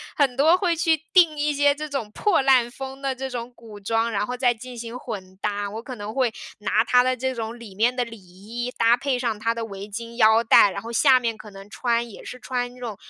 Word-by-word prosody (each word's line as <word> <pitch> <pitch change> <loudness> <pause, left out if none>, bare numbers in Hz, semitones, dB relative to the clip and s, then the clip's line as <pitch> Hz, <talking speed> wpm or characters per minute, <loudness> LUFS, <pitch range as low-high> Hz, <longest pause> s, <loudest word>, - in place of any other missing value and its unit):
很 270 -4 +1
多 315 +5 +5
会 355 -4 +1
去 320 -2 +1
订 335 -4 +5
一 295 +1 +1
些 285 0 +3
这 305 +1 -6
种 250 -7 -4
破 400 - +2
烂 255 -3 +4
风 270 +1 -8
的 270 -1 -1
这 265 +1 -4
种 245 -1 -6
古 220 -3 -12
装， 225 +3 0
然 205 -1 0
后 250 0 -4
再 245 -1 +3
进 245 +2 -10
行 230 +1 -7
混 190 -5 -7
搭。 205 -1 -2
我 220 +2 -6
可 255 0 -7
能 210 0 -7
会 255 -3 +1 0.3
拿 210 +2 +2
它 250 0 +4
的 255 0 0
这 260 +1 -2
种 230 +1 -5
里 215 -5 -11
面 235 +5 +2
的 245 - 0
里 230 -1 -10
衣， 210 +7 -7
搭 230 +1 +5
配 275 -1 -1
上 235 -4 -2
它 230 +2 0
的 230 -1 -3
围 200 -1 -8
巾、 230 +3 -7
腰 220 0 +5
带， 225 -2 +6
然 - - -5
后 230 - -8
下 255 +2 +5
面 230 -2 -2
可 210 - -11
能 195 0 -12
穿 235 -1 0
也 - - -12
是 250 - -8
穿 245 -1 -3
那 250 - -16
种 230 -4 -5
240 Hz, 270 characters per minute, -23 LUFS, 220-260 Hz, 0.3 s, 带